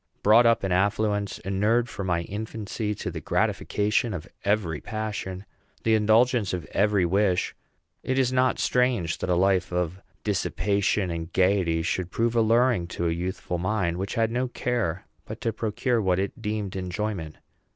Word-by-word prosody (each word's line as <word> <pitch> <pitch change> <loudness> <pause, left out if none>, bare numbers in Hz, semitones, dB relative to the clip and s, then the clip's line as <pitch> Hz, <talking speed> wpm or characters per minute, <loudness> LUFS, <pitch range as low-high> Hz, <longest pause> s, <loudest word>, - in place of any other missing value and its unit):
Brought 115 +3 +6
up 115 -3 +3
in 95 - -1
affluence, 105 +2 +1
inured 105 +5 +1
from 100 -5 -5
my 85 -2 +1
infancy 105 +2 -4
to - - -4
the - - -6
gratification 105 +1 0
of 90 +2 -7 0.2
every 100 -7 0
passion, 105 -3 -4 0.4
the 115 - +3
indulgence 110 -1 +3
of 90 -3 -3
every 100 -2 +2
wish, 95 0 +1 0.5
it 130 - -1
is 130 -1 +2
not 130 0 +2
strange 125 -10 +1
that - - -3
a 90 - +3
life 95 -1 +2
of 90 +1 -2 0.2
dissipation 100 -1 0
and 85 0 -5
gayety 90 -3 +2
should 90 0 -1
prove 115 +4 0
alluring 115 -4 +3
to 85 0 -2
a - - +1
youthful 90 0 -3
mind 90 -2 0
which 95 +4 -3
had 115 -1 +1
no 125 +2 0
care 115 -8 -2 0.2
but 110 +2 -7
to 115 - -1
procure 115 +2 0
what 95 -3 +2
is 95 +1 -1
deemed 105 -3 -3
enjoyment. 95 -3 -3
100 Hz, 160 wpm, -26 LUFS, 90-110 Hz, 0.5 s, Brought